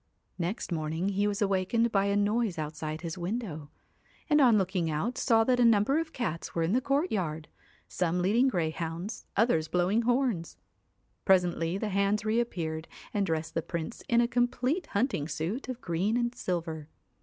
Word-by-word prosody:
Next 180 Hz, +3 st, -3 dB
morning 160 Hz, +3 st, -1 dB
he 200 Hz, +1 st, +1 dB
was 205 Hz, +1 st, 0 dB
awakened 200 Hz, +4 st, +1 dB
by 195 Hz, -2 st, +2 dB
a 200 Hz, 0 st, +1 dB
noise 205 Hz, -1 st, +1 dB
outside 155 Hz, 0 st, -4 dB
his 170 Hz, +1 st, -5 dB
window, 175 Hz, -6 st, -4 dB, 0.6 s
and 300 Hz, 0 st, +6 dB
on 240 Hz, -5 st, +6 dB
looking 185 Hz, -4 st, 0 dB
out 175 Hz, +12 st, -1 dB
saw 225 Hz, -3 st, +3 dB
that 250 Hz, +1 st, +2 dB
a -, -, +5 dB
number 230 Hz, +6 st, +4 dB
of 325 Hz, -1 st, -4 dB
cats 195 Hz, -, -4 dB
were 165 Hz, -, +1 dB
in 165 Hz, -, 0 dB
the 255 Hz, -, +3 dB
courtyard, 205 Hz, -, -1 dB, 0.4 s
some 180 Hz, 0 st, -1 dB
leading 215 Hz, +9 st, +3 dB
greyhounds, 170 Hz, 0 st, -3 dB
others 195 Hz, -8 st, +3 dB
blowing 180 Hz, +7 st, +2 dB
horns. 240 Hz, -7 st, 0 dB, 0.7 s
Presently 180 Hz, -2 st, +2 dB
the 210 Hz, +1 st, -2 dB
hands 200 Hz, +2 st, +1 dB
reappeared 175 Hz, -9 st, -1 dB, 0.3 s
and 200 Hz, -2 st, +1 dB
dressed 160 Hz, -1 st, -2 dB
the 165 Hz, -, 0 dB
Prince 170 Hz, +6 st, -5 dB
in 235 Hz, 0 st, +5 dB
a 235 Hz, -, +2 dB
complete 250 Hz, +7 st, 0 dB
hunting 200 Hz, -, 0 dB
suit 165 Hz, -, -3 dB
of 250 Hz, -1 st, -5 dB
green 185 Hz, +6 st, 0 dB
and 240 Hz, 0 st, 0 dB
silver. 165 Hz, -6 st, -4 dB
195 Hz, 165 wpm, -29 LUFS, 165-235 Hz, 0.7 s, and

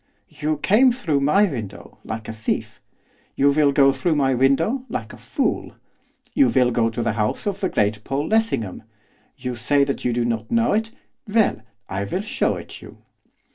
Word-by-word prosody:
'You 155 Hz, 0 st, -2 dB
came 220 Hz, -, +4 dB
through 170 Hz, -, -1 dB
my 150 Hz, +9 st, +3 dB
window, 115 Hz, -, -7 dB
like 110 Hz, 0 st, -6 dB
a -, -, -5 dB
thief. 110 Hz, 0 st, -3 dB, 0.5 s
You 140 Hz, +1 st, +4 dB
will 145 Hz, 0 st, +3 dB
go 135 Hz, -1 st, +5 dB
through 155 Hz, +5 st, 0 dB
my 135 Hz, -2 st, +2 dB
window, 140 Hz, -, +2 dB
like -, -, -5 dB
a -, -, -11 dB
fool. -, -, -2 dB, 0.6 s
You 280 Hz, -, +4 dB
will 125 Hz, -1 st, +3 dB
go 115 Hz, -1 st, +2 dB
to 115 Hz, +1 st, -3 dB
the 115 Hz, -, +1 dB
house 105 Hz, -1 st, -2 dB
of 200 Hz, -1 st, -2 dB
the 190 Hz, -, 0 dB
great 105 Hz, 0 st, 0 dB
Paul 140 Hz, +5 st, -2 dB
Lessingham. 220 Hz, -, 0 dB, 0.6 s
You 125 Hz, -, -4 dB
say 140 Hz, +5 st, +2 dB
you 140 Hz, -3 st, -2 dB
do 120 Hz, 0 st, 0 dB
not 115 Hz, -2 st, -2 dB
know 230 Hz, 0 st, +2 dB
it? 220 Hz, +1 st, 0 dB, 0.4 s
Well, 210 Hz, -, +2 dB, 0.3 s
I 95 Hz, +1 st, -3 dB
will 110 Hz, -, -2 dB
show 215 Hz, -, 0 dB
it -, -, -9 dB
you. -, -, -13 dB
140 Hz, 180 wpm, -22 LUFS, -, 0.6 s, go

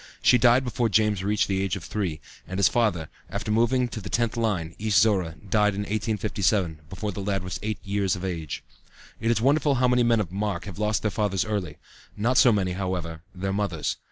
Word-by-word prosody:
She 125 Hz, -, +6 dB
died 125 Hz, +2 st, +5 dB
before 120 Hz, -2 st, 0 dB
James 105 Hz, -2 st, +2 dB
reached 105 Hz, +1 st, +1 dB
the 95 Hz, -1 st, 0 dB
age 95 Hz, -3 st, -1 dB
of 95 Hz, -, -7 dB
three, 90 Hz, -7 st, -3 dB, 0.3 s
and 95 Hz, -, -5 dB
his 100 Hz, -, +5 dB
father, 105 Hz, -10 st, +1 dB, 0.2 s
after 105 Hz, -, -3 dB
moving 120 Hz, +3 st, +2 dB
to 110 Hz, -, -6 dB
the 100 Hz, -, -7 dB
10th 115 Hz, -1 st, 0 dB
line, 100 Hz, -8 st, -1 dB
East 105 Hz, -4 st, +3 dB
Zorra, 95 Hz, -5 st, +2 dB
died 105 Hz, 0 st, +2 dB
in 100 Hz, -, -2 dB
1857, 105 Hz, -5 st, 0 dB
before 105 Hz, +3 st, -4 dB
the 100 Hz, -, -6 dB
lad 100 Hz, -1 st, -1 dB
was 90 Hz, -, -5 dB
eight 110 Hz, -1 st, -2 dB
years 100 Hz, -2 st, 0 dB
of 90 Hz, +1 st, -5 dB
age. 80 Hz, -6 st, -4 dB, 0.6 s
It 115 Hz, -, 0 dB
is 115 Hz, -2 st, +2 dB
wonderful 140 Hz, +2 st, +3 dB
how 125 Hz, 0 st, +3 dB
many 125 Hz, 0 st, +3 dB
men 120 Hz, -1 st, +3 dB
of 95 Hz, -5 st, -2 dB
mark 100 Hz, -3 st, -2 dB
have 100 Hz, -1 st, -8 dB
lost 105 Hz, 0 st, 0 dB
their 105 Hz, -, +1 dB
fathers 100 Hz, -3 st, 0 dB
early; 100 Hz, -8 st, -3 dB, 0.4 s
not 120 Hz, +5 st, +2 dB
so 125 Hz, -, +7 dB
many, 95 Hz, -4 st, +1 dB
however, 90 Hz, -3 st, -3 dB
their 95 Hz, +1 st, -2 dB
mothers. 100 Hz, -7 st, -1 dB
105 Hz, 210 wpm, -25 LUFS, 95-110 Hz, 0.6 s, so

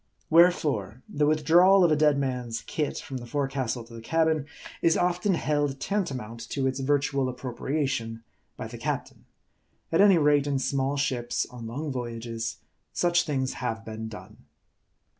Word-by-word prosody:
Wherefore, 145 Hz, -, +3 dB
the 145 Hz, 0 st, 0 dB
withdrawal 170 Hz, +6 st, +5 dB
of 170 Hz, -, +4 dB
a -, -, +5 dB
dead 150 Hz, -1 st, +3 dB
man's 125 Hz, -4 st, -2 dB
"kit" 150 Hz, -2 st, -3 dB
from 135 Hz, -, -6 dB
the 120 Hz, -1 st, -8 dB
forecastle 135 Hz, -4 st, -2 dB
to 115 Hz, +1 st, -15 dB
the 115 Hz, -, -8 dB
cabin, 160 Hz, +2 st, +1 dB, 0.3 s
is 165 Hz, -, +3 dB
often 180 Hz, +2 st, +1 dB
held 145 Hz, -3 st, 0 dB
tantamount 130 Hz, -, -3 dB
to 135 Hz, -2 st, -1 dB
its 130 Hz, 0 st, -1 dB
virtual 140 Hz, -1 st, +1 dB
appropriation 125 Hz, -2 st, -3 dB, 0.3 s
by -, -, -5 dB
the -, -, -8 dB
captain. -, -, -4 dB, 0.7 s
At 165 Hz, -, +4 dB
any 200 Hz, -3 st, +7 dB
rate, 145 Hz, -2 st, +3 dB
in 140 Hz, -1 st, +1 dB
small 135 Hz, +1 st, -1 dB
ships 130 Hz, -4 st, -1 dB
on 120 Hz, -2 st, -8 dB
long 145 Hz, +6 st, -4 dB
voyages, 115 Hz, -2 st, -4 dB, 0.3 s
such 175 Hz, 0 st, +2 dB
things 130 Hz, -3 st, -1 dB
have 115 Hz, -3 st, -3 dB
been 110 Hz, 0 st, -6 dB
done. 110 Hz, -1 st, -11 dB
135 Hz, 155 wpm, -27 LUFS, 120-155 Hz, 0.7 s, any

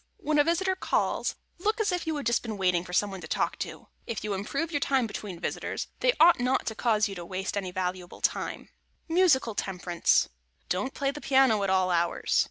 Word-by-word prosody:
When 310 Hz, -6 st, +1 dB
a -, -, +7 dB
visitor 365 Hz, +4 st, +1 dB
calls, 375 Hz, -, 0 dB, 0.2 s
look 430 Hz, +6 st, 0 dB
as 420 Hz, -3 st, +1 dB
if 355 Hz, -2 st, -2 dB
you 320 Hz, -, 0 dB
had 290 Hz, -, -4 dB
just 235 Hz, +1 st, +2 dB
been 220 Hz, -3 st, -5 dB
waiting 180 Hz, -2 st, +2 dB
for 180 Hz, -, -10 dB
some 200 Hz, +3 st, +1 dB
one 190 Hz, -1 st, -7 dB
to 160 Hz, -, -8 dB
talk -, -, -1 dB
to. -, -, -6 dB, 0.2 s
If 230 Hz, -, -4 dB
you 210 Hz, -1 st, -2 dB
improve 275 Hz, -, -2 dB
your 290 Hz, -, 0 dB
time 270 Hz, -3 st, +2 dB
between 205 Hz, -4 st, -6 dB
visitors, -, -, -3 dB
they -, -, +3 dB
ought 335 Hz, -1 st, +7 dB
not 250 Hz, +2 st, +1 dB
to 220 Hz, -, -2 dB
cause 215 Hz, -2 st, +2 dB
you 200 Hz, -, -6 dB
to 175 Hz, -2 st, -7 dB
waste 190 Hz, +3 st, -4 dB
any 195 Hz, -2 st, -2 dB
valuable 180 Hz, -1 st, -4 dB
time. -, -, -2 dB, 0.4 s
[Sidenote: 340 Hz, +2 st, +2 dB
MUSICAL 265 Hz, -9 st, +3 dB
TEMPERANCE] 180 Hz, -3 st, +1 dB, 0.4 s
Don't 205 Hz, +9 st, -1 dB
play 275 Hz, -1 st, 0 dB
the 295 Hz, +1 st, -9 dB
piano 265 Hz, -6 st, +4 dB
at 195 Hz, -, 0 dB
all 185 Hz, -1 st, +2 dB
hours. 170 Hz, 0 st, +1 dB
220 Hz, 220 wpm, -28 LUFS, 185-295 Hz, 0.4 s, a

